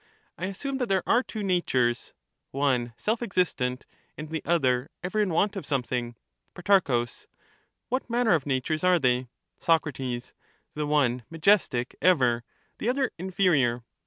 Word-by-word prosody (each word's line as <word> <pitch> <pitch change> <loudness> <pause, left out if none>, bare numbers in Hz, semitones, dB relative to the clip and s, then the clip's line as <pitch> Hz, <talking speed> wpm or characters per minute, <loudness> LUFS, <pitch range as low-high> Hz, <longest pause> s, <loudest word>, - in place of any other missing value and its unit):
I 185 - -4
assume 270 +8 -4
that 250 - -1
there 190 -2 +1
are 240 - +4
two 220 -4 -6
natures, 130 -11 0 0.3
one 130 -4 0
self 220 +2 -1
existent, 165 - -1 0.3
and 150 0 -7
the 160 - -2
other 130 -7 +1
ever 185 +4 -2
in 210 -2 +2
want 195 +5 +1
of 195 - -4
something. 125 -3 -2 0.4
Pro, 175 -10 +3 0.8
What 255 0 -2
manner 235 -1 +2
of 150 -4 0
natures 140 +4 -1
are 180 -1 +5
they? 125 -4 +1 0.3
Soc. 165 -1 +3
The 130 +3 -7
one 130 -5 +2
majestic 165 -7 +2
ever, 125 -10 +3 0.4
the 225 - 0
other 260 0 0
inferior. 165 -10 +1
160 Hz, 140 wpm, -27 LUFS, 125-195 Hz, 0.8 s, are